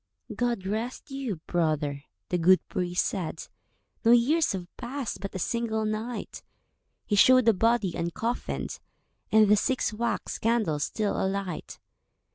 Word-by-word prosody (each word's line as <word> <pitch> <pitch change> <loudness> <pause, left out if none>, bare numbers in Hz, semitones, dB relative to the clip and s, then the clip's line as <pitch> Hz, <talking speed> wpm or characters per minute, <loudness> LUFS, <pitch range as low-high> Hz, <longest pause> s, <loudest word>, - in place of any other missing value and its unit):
"God 235 -4 -1
rest 225 +7 -4
you, 270 -6 -3
brother," 150 -4 -1 0.2
the 180 - 0
good 185 +3 +4
priest 180 0 0
said, 185 -6 -4 0.6
"No 230 - +3
years 255 +7 +4
have 185 -2 -4
passed—but 240 -6 -5
a - - 0
single 220 +2 -1
night." 220 +3 -4 0.6
He 210 - 0
showed 255 +4 +6
the 225 - +6
body 225 -1 +2
uncoffinèd, 170 +9 -3 0.5
And 220 -1 +6
the 210 - +6
six 250 +2 0
wax 230 0 -2
candles 215 -11 +1
still 215 -3 -1
alight. 190 -2 -3
215 Hz, 130 wpm, -27 LUFS, 185-235 Hz, 0.6 s, showed